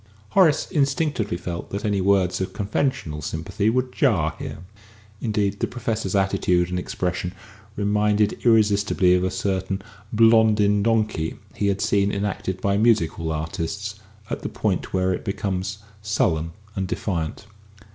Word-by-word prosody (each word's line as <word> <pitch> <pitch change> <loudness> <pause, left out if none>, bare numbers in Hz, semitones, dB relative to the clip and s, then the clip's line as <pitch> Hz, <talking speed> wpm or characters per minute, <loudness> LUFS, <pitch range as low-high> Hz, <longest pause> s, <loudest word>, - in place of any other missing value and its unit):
Horace 155 - +4
instinctively 140 - 0
felt 85 -1 -5
that 100 +2 -4
any 100 -2 +1
words 95 -2 +2
of 95 - -3
conventional 100 - -1
sympathy 95 +8 -1
would 125 +2 0
jar 90 - +2
here; 80 - -6 0.6
indeed, 105 -3 0
the - - 0
Professor's 110 -5 -2
attitude 90 -2 +2
and 90 - 0
expression 90 0 -3 0.4
reminded 105 0 +2
him - - -11
irresistibly 105 -5 +4
of 90 0 +2
a 95 - +1
certain 95 0 -1 0.3
"Blondin 110 -2 +5
Donkey" 110 -7 0 0.2
he 100 - -1
had 100 0 0
seen 100 0 +2
enacted 100 -2 -2
by 100 0 +1
music 110 -6 +3
hall 80 -1 -4
artists, 85 +7 -3 0.4
at - - -3
the - - -3
point - - -1
where 95 0 +1
it - - -4
becomes 95 -1 -2 0.2
sullen 85 -6 0 0.2
and 95 -1 -1
defiant. 85 -1 -3
100 Hz, 145 wpm, -23 LUFS, 90-105 Hz, 0.6 s, Blondin